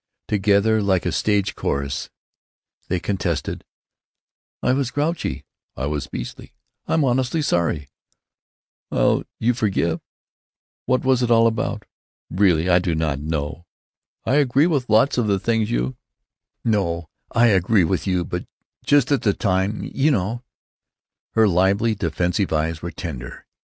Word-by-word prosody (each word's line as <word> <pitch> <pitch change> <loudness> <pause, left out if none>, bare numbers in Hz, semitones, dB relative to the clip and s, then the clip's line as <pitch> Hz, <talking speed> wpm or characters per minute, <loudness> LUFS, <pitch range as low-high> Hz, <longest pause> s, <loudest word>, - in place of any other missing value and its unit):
Together, 105 +2 +3
like 95 -3 +1
a 90 - +1
stage 100 +3 +1
chorus, 70 0 -3 0.8
they 90 - 0
contested: 95 0 -2 1.0
"I - - +3
was 135 -2 0
grouchy——" 150 +6 -2 0.3
"I 65 - -2
was 75 -2 -2
beastly——" - - -7 0.3
"I'm 160 -2 +2
honestly 130 +4 +1
sorry——" 85 - 0 1.0
"'ll - - +2
you 120 +2 +2
forgive——" 100 -7 0 0.9
"What 130 +1 +1
was 130 -1 +3
it 120 - +1
all 115 -1 +5
about?" 110 -2 -1 0.5
"Really, 90 -3 +3
I 90 -1 +5
do—not—know!" 80 -2 -2 0.6
"I 130 - +2
agree 140 +1 +3
with 145 -8 0
lots 110 +5 +4
of 115 - +1
the 100 -1 +2
things 110 +2 0
you——" 60 +2 -1 0.7
"No, 85 -7 0 0.2
I 120 0 +4
agree 95 0 +3
with 90 +4 -1
you, 90 -2 +1
but 90 - -5 0.4
just 145 -2 +3
at 140 -5 +3
the 100 - +2
time—you 105 +8 0
know." 115 -2 0 0.9
Her 110 -1 +4
lively, 100 +5 +2
defensive 90 0 -1
eyes 80 +1 -1
were 85 - -4
tender. 70 -10 -7
100 Hz, 130 wpm, -22 LUFS, 85-115 Hz, 1.0 s, all